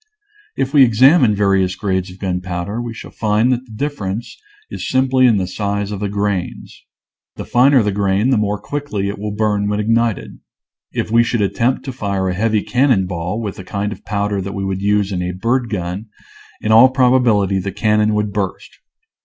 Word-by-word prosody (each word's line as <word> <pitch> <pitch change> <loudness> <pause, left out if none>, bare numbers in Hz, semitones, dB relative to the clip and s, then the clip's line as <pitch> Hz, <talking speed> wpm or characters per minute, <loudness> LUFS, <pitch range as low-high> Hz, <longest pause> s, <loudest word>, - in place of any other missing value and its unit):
If 135 0 -1
we 145 - +6
examine 125 0 +5
various 95 -2 +1
grades 95 -2 -2
of 90 - -12
gunpowder 90 +3 -3
we 120 -1 -5
shall 115 - -10
find 110 +3 +1
that 125 +1 -4
the 120 - -17
difference 110 -4 -4 0.4
is - - -5
simply 130 0 +3
in 115 -4 +3
the 95 - -1
size 100 +2 -3
of 100 - -4
the 105 0 -2
grains; 100 -3 -3 0.5
the - - -7
finer 130 0 +4
the 105 - 0
grain 100 +4 +1
the 130 - +3
more 105 -1 -1
quickly 125 -10 -3
it 100 - -6
will 105 +1 -4
burn 105 -1 0
when 105 0 -1
ignited. 115 0 -1 0.5
If - - -3
we 115 +1 +5
should 115 -1 -1
attempt 120 +7 0
to 130 - -5
fire 100 -5 -2
a - - -1
heavy 110 +2 0
cannon 125 -6 +2
ball 90 +3 -4
with 105 -4 -5
the 95 - -8
kind 100 +2 -3
of - - -9
powder 100 -1 -2
that 100 +1 -6
we 100 0 -3
would 95 0 -3
use 100 0 +1
in 90 -2 -2
a 90 0 -3
bird 120 +6 -1
gun, 95 +1 -4 0.5
in 110 - -1
all 115 +4 +8
probability 125 -7 +2
the 95 +1 -4
cannon 105 +1 +1
would 105 -1 -1
burst. 100 -3 -4
105 Hz, 195 wpm, -18 LUFS, 100-115 Hz, 0.5 s, all